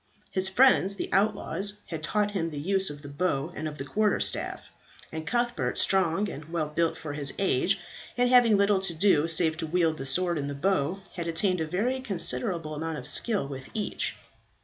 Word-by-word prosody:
His 190 0 +1
friends, 200 -3 +4
the - - -5
outlaws, 200 -1 +1
had 160 -2 -6
taught 210 +5 0
him 170 -5 -2
the 150 - -8
use 190 +5 +1
of 145 0 -9
the - - -8
bow 140 -1 -2
and 155 - -4
of 150 -1 -7
the 135 - -6
quarter 210 +6 +1
staff; - - -1 0.4
and 160 0 -6
Cuthbert, 240 +2 -1
strong 190 +1 +2
and 150 -5 -8
well 160 -1 -3
built 165 +2 0
for 150 -2 -6
his 145 -2 -1
age, 195 +1 +1 0.4
and 245 0 +3
having 245 -4 +5
little 200 0 +3
to 190 -3 +1
do 160 -3 +3
save 160 -1 +3
to 160 - -3
wield 165 -1 0
the 135 - -4
sword 175 +2 +2
and 140 0 -3
the 140 - -5
bow, 185 +2 0
had 170 -1 -5
attained 180 +2 +1
a 160 - -2
very 230 +11 -1
considerable 170 - -1
amount 160 +1 -4
of 125 - -8
skill 210 - +2
with 135 -1 -8
each. 210 -2 -2
170 Hz, 200 wpm, -27 LUFS, 155-200 Hz, 0.4 s, having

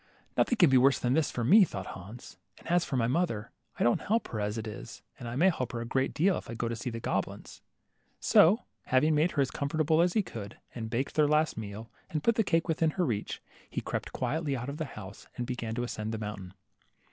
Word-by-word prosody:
* - - -36
Nothing 245 - +3
can 175 -7 +6
be 130 - +7
worse 135 +2 +5
than 125 0 0
this 155 0 +2
for 120 - -3
me," 195 - +7
thought 95 - -3
Hans, 105 +7 -10 0.2
and - - -15
as 175 +1 +3
for 135 - -2
my 115 - +2
mother, 120 -5 -1 0.3
I - - +1
don't 120 - +3
help 225 +3 0
her 110 - -4
as 105 +1 -2
it 110 - -4
is, 105 - -8 0.2
and 120 0 -5
may 190 +3 +6
help 125 -7 -4
her 120 - -2
a - - -4
great 130 +2 0
deal, 180 +5 +2
if - - -14
I 115 - -5
go 115 - -2
to 115 - -2
see 110 +2 -4
the 115 -1 -5
goblins." - - -3 0.6
So 200 +9 +5 0.2
having 150 +5 +3
made 155 +4 +2
her 145 - +3
as 135 - -4
comfortable 155 +2 +1
as 175 0 +2
he 215 - +2
could, 105 - -8 0.2
and 110 -2 -5
baked 125 +4 -2
their 150 -1 +4
last 150 +1 +2
meal, 110 +1 -7 0.2
and 155 -2 -2
put 235 - +4
the 225 - +2
cake 165 -3 +1
within 160 -1 +2
her 180 - +2
reach, 105 -7 -3 0.3
he - - -3
crept - - -4
quietly 150 -3 -1
out 125 +3 -4
of 140 - -5
the 160 - -2
house, 105 -7 -10
and 125 - -2
began 120 -3 -4
to 120 - -1
ascend 110 -2 -4
the - - -2
mountain. 105 -3 -6
130 Hz, 250 wpm, -30 LUFS, 115-160 Hz, 0.6 s, be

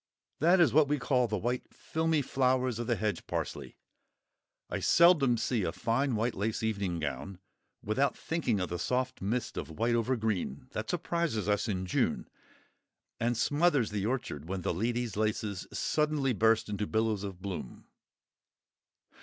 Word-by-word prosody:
That 175 +4 +5
is 165 -8 +5
what 150 0 +5
we 150 +1 +1
call 125 -1 +2
the 105 -1 -1
white 120 +5 -2
filmy 160 -2 0
flowers 130 -2 +1
of 120 - -3
the 120 - +2
hedge 105 -5 -2
parsley. - - -4 0.9
I - - -3
seldom 160 -8 +5
see 115 0 0
a 85 - -1
fine 115 +8 0
white 115 +3 0
lace 110 +3 -2
evening 100 -5 -1
gown 80 +5 -4 0.5
without 135 +7 +1
thinking 150 -11 -1
of 90 - -2
the 90 - -3
soft 125 +6 -1
mist 115 +5 -2
of 75 - -4
white 115 +9 0
over 120 +2 +1
green 110 - -2
that - - -4
surprises 160 - -1
us 105 +2 +1
in 95 -3 -2
June, 90 - 0 0.9
and 120 0 0
smothers 145 -2 +2
the 105 0 -1
orchard 85 - -3
when 95 -1 -3
the - - 0
Lady's 115 +3 -1
Laces 105 -3 -1
suddenly 150 -4 +1
burst 110 0 +3
into 105 0 -2
billows 110 -2 0
of 95 -3 -6
bloom. 95 -10 -6
115 Hz, 160 wpm, -31 LUFS, 100-130 Hz, 0.9 s, That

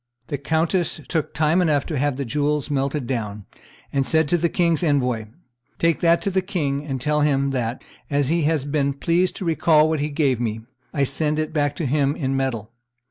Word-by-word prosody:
The 145 - -3
countess 160 +4 0
took 160 -3 -1
time 155 +5 +2
enough 150 -5 +2
to 155 - -3
have 145 -1 +1
the 140 - -3
jewels 150 +3 -1
melted 140 0 -1
down, 105 -5 -4 0.5
and 140 -1 +2
said 160 +3 +2
to 175 - +3
the 170 +1 +1
king's 170 -1 +1
envoy, 125 -8 +1 0.5
"Take 165 -1 +2
that 170 0 +3
to 200 - 0
the 190 0 +1
king, 150 -7 -2
and 135 -2 -3
tell 150 +4 +1
him 140 -2 +2
that, 125 -2 -2 0.3
as 145 -1 +1
he 170 +1 +2
has 155 -3 +1
been 140 -1 0
pleased 170 +6 +1
to 190 - -5
recall 160 -1 +4
what 160 -1 0
he 150 +1 -1
gave 140 -5 +1
me, 110 -2 -2 0.3
I 140 - 0
send 150 +2 0
it 155 0 -2
back 145 -2 0
to 160 - -3
him 140 +1 +1
in 135 -2 -1
metal. 120 -5 -2
145 Hz, 205 wpm, -22 LUFS, 135-160 Hz, 0.5 s, recall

